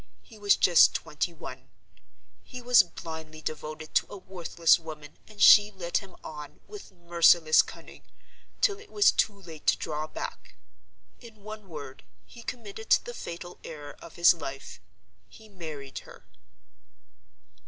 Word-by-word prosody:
He 220 Hz, -3 st, -16 dB
was 205 Hz, -1 st, +4 dB
just 175 Hz, -2 st, +5 dB
twenty 155 Hz, +2 st, -2 dB
one: 165 Hz, -, -10 dB, 0.7 s
he 250 Hz, -, -10 dB
was 245 Hz, -2 st, +6 dB
blindly 160 Hz, -3 st, -9 dB
devoted 155 Hz, 0 st, -6 dB
to -, -, +2 dB
a 205 Hz, -, -8 dB
worthless 175 Hz, -2 st, +1 dB
woman; 155 Hz, -3 st, -11 dB
and 215 Hz, -1 st, -16 dB
she 205 Hz, 0 st, +8 dB
led 180 Hz, -4 st, -2 dB
him 195 Hz, -2 st, -8 dB
on, 150 Hz, -2 st, -9 dB
with 415 Hz, -, -11 dB
merciless 170 Hz, -2 st, +4 dB
cunning, -, -, -12 dB, 0.6 s
till 405 Hz, 0 st, +2 dB
it 420 Hz, 0 st, -16 dB
was 415 Hz, -1 st, +5 dB
too 205 Hz, -2 st, 0 dB
late 165 Hz, -5 st, -12 dB
to -, -, +4 dB
draw 155 Hz, +1 st, -4 dB
back. -, -, -8 dB, 0.6 s
In 220 Hz, -4 st, -15 dB
one 215 Hz, -2 st, -9 dB
word, 140 Hz, -4 st, -9 dB, 0.2 s
he 235 Hz, -, -14 dB
committed 220 Hz, -2 st, -8 dB
the 485 Hz, -, +3 dB
fatal 175 Hz, -, -8 dB
error 145 Hz, -2 st, -9 dB
of 170 Hz, -, -12 dB
his 170 Hz, +1 st, +6 dB
life: 135 Hz, -5 st, -8 dB, 0.5 s
he 220 Hz, -2 st, -16 dB
married 155 Hz, -9 st, -8 dB
her. -, -, -15 dB
175 Hz, 145 wpm, -28 LUFS, 155-210 Hz, 0.7 s, she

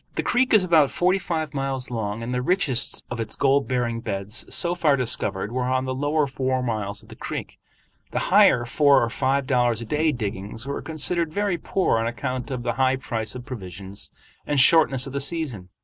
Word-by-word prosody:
The -, -, -1 dB
creek 255 Hz, +1 st, +1 dB
is 215 Hz, -4 st, +6 dB
about 160 Hz, -6 st, +4 dB
forty 185 Hz, +2 st, +1 dB
five 160 Hz, -4 st, -3 dB
miles 135 Hz, -2 st, -2 dB
long, 110 Hz, -1 st, -3 dB
and 120 Hz, +2 st, -4 dB
the 125 Hz, -, 0 dB
richest 140 Hz, -5 st, +1 dB
of 120 Hz, -, -4 dB
its 115 Hz, -1 st, -3 dB
gold 140 Hz, 0 st, +2 dB
bearing 120 Hz, -2 st, -1 dB
beds 100 Hz, +1 st, -3 dB
so 175 Hz, 0 st, +1 dB
far 155 Hz, -5 st, +2 dB
discovered 105 Hz, -5 st, 0 dB
were 125 Hz, 0 st, -1 dB
on 130 Hz, +1 st, 0 dB
the 130 Hz, -, -2 dB
lower 145 Hz, +3 st, +1 dB
four 130 Hz, -1 st, -2 dB
miles 105 Hz, -4 st, -3 dB
of -, -, -19 dB
the -, -, -11 dB
creek; -, -, -6 dB, 0.5 s
the -, -, -5 dB, 0.2 s
higher 120 Hz, -1 st, +6 dB
four 140 Hz, +2 st, +4 dB
or 115 Hz, -, -2 dB
five 135 Hz, +1 st, 0 dB
dollars 120 Hz, -4 st, +1 dB
a 115 Hz, -, -6 dB
day 155 Hz, +5 st, +1 dB
diggings 105 Hz, -2 st, -5 dB
were 140 Hz, +1 st, -4 dB
considered 160 Hz, +2 st, -1 dB
very 200 Hz, -1 st, -1 dB
poor 185 Hz, -12 st, 0 dB
on 115 Hz, -, -1 dB
account 125 Hz, +3 st, -4 dB
of 125 Hz, -3 st, -4 dB
the 120 Hz, -1 st, -1 dB
high 130 Hz, 0 st, +3 dB
price 115 Hz, -4 st, -4 dB
of 125 Hz, -1 st, -8 dB
provisions 100 Hz, -6 st, -8 dB, 0.4 s
and 145 Hz, -1 st, +1 dB
shortness 140 Hz, -2 st, +5 dB
of 135 Hz, -, -8 dB
the 140 Hz, -, -2 dB
season. 135 Hz, -, -3 dB
130 Hz, 205 wpm, -24 LUFS, 115-145 Hz, 0.5 s, is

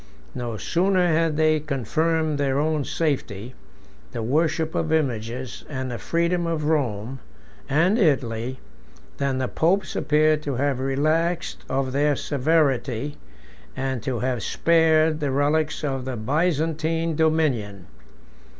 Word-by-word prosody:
No 120 Hz, -3 st, -4 dB
sooner 180 Hz, -, +2 dB
had 160 Hz, -1 st, +1 dB
they 155 Hz, 0 st, +3 dB
confirmed 155 Hz, +3 st, 0 dB
their 135 Hz, -1 st, +1 dB
own 155 Hz, 0 st, +1 dB
safety, 125 Hz, -8 st, -2 dB, 0.6 s
the 115 Hz, -, -3 dB
worship 155 Hz, +5 st, 0 dB
of 160 Hz, -, -1 dB
images, 125 Hz, -4 st, -2 dB
and 130 Hz, -3 st, -4 dB
the 120 Hz, -, -5 dB
freedom 170 Hz, +1 st, 0 dB
of 165 Hz, -2 st, -1 dB
Rome 130 Hz, -5 st, -1 dB, 0.5 s
and 170 Hz, -, +3 dB
Italy, 130 Hz, -, 0 dB, 0.6 s
than 140 Hz, -2 st, 0 dB
the 130 Hz, -1 st, -1 dB
popes 175 Hz, +6 st, 0 dB
appear 155 Hz, 0 st, +3 dB
to 145 Hz, -3 st, -4 dB
have 135 Hz, 0 st, 0 dB
relaxed 155 Hz, +6 st, 0 dB
of 130 Hz, 0 st, -1 dB
their 145 Hz, +2 st, +2 dB
severity, 140 Hz, -3 st, 0 dB, 0.6 s
and 130 Hz, -2 st, -2 dB
to 120 Hz, +1 st, -3 dB
have 125 Hz, -2 st, -1 dB
spared 160 Hz, -1 st, +3 dB
the 145 Hz, -2 st, -1 dB
relics 150 Hz, +3 st, +1 dB
of 135 Hz, -3 st, -2 dB
the 130 Hz, -2 st, -4 dB
Byzantine 160 Hz, +4 st, 0 dB
dominion. 140 Hz, -, 0 dB
150 Hz, 125 wpm, -24 LUFS, 130-160 Hz, 0.6 s, they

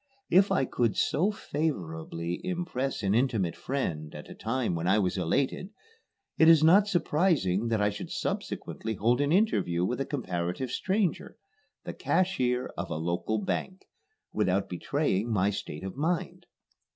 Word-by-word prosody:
If 190 Hz, +3 st, +5 dB
I 135 Hz, -, +2 dB
could 120 Hz, -3 st, 0 dB
so 180 Hz, +8 st, +2 dB
favorably 85 Hz, -, -3 dB
impress 165 Hz, -, -2 dB
an 100 Hz, 0 st, +2 dB
intimate 110 Hz, -7 st, +1 dB
friend 80 Hz, -, -3 dB
at -, -, -9 dB
a -, -, -6 dB
time 115 Hz, -3 st, -1 dB
when 85 Hz, +1 st, -2 dB
I 95 Hz, +3 st, +4 dB
was 95 Hz, -4 st, +1 dB
elated, 130 Hz, -, 0 dB, 0.7 s
it 160 Hz, -, +7 dB
is 160 Hz, -2 st, +7 dB
not 195 Hz, +6 st, +6 dB
surprising 150 Hz, -, +1 dB
that 110 Hz, -2 st, +1 dB
I 105 Hz, 0 st, +2 dB
should 100 Hz, -, -7 dB
subsequently 110 Hz, 0 st, -3 dB
hold 120 Hz, +7 st, +2 dB
an 145 Hz, +1 st, +1 dB
interview 160 Hz, -, +2 dB
with 125 Hz, +7 st, -2 dB
a -, -, -1 dB
comparative 90 Hz, -, -3 dB
stranger 195 Hz, +4 st, -1 dB, 0.5 s
the -, -, -5 dB
cashier 130 Hz, -10 st, 0 dB
of -, -, -4 dB
a -, -, -3 dB
local 85 Hz, +7 st, -1 dB
bank 185 Hz, -, -3 dB, 0.5 s
without 95 Hz, +2 st, +1 dB
betraying 115 Hz, -, -1 dB
my 100 Hz, -1 st, +2 dB
state 75 Hz, -4 st, -6 dB
of 95 Hz, +2 st, -5 dB
mind. 160 Hz, +5 st, -2 dB
120 Hz, 150 wpm, -28 LUFS, -, 0.7 s, it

